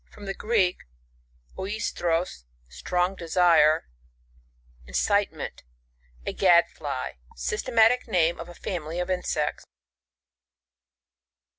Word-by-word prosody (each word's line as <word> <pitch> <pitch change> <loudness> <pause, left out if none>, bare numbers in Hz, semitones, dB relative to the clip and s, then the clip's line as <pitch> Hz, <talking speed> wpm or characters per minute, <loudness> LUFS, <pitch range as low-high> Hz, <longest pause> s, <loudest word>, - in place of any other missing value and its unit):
— - - -33
Fiom 205 - -12
the 195 - -3
Greek, 200 -4 +1 0.8
oiHros, 175 - -2 0.2
strong 180 - -1
desire, 165 -3 +4 1.0
inciti 60 0 +1
ment; - - -7 0.6
a - - -2
gad 175 -3 +5
fly. 140 - -5 0.2
Systematic 225 - +2
name 170 -5 +2
of 170 - -7
a 175 - -11
family 170 -2 -4
of 180 +1 -2
insects. 180 -1 -1
175 Hz, 100 wpm, -26 LUFS, 160-195 Hz, 1.0 s, gad